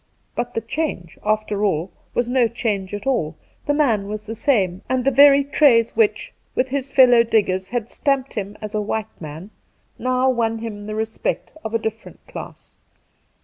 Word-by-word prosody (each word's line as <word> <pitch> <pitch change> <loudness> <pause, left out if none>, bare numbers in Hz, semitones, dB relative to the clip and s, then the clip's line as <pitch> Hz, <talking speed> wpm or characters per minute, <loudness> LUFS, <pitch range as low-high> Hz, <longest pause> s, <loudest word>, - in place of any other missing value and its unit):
But 240 0 -3
the 225 - 0
change, 225 - -4
after 215 -1 0
all, 185 -3 0 0.2
was 240 - +1
no 250 -1 +3
change 210 -4 -2
at 205 0 -5
all: 240 - 0 0.3
the 290 - +3
man 230 -10 +2
was 210 +1 -5
the 220 - -6
same, 195 -7 +1
and 255 -1 0
the 275 - +4
very 280 +1 +7
traits 270 -5 +4
which, 440 -3 +1 0.2
with 255 +1 +1
his 275 0 -3
fellow 250 -3 +7
diggers, 195 -5 +1
had 240 -2 -2
stamped 275 0 -1
him 205 -2 -5
as 215 0 -6
a 215 - 0
white 220 0 -4
man, 160 +6 -8 0.5
now 255 +1 +1
won 225 -2 0
him 210 -2 -6
the 215 - -4
respect 220 0 -3
of 220 +1 -3
a - - +5
different 220 0 -6
class. - - -10
225 Hz, 180 wpm, -21 LUFS, 205-255 Hz, 0.5 s, very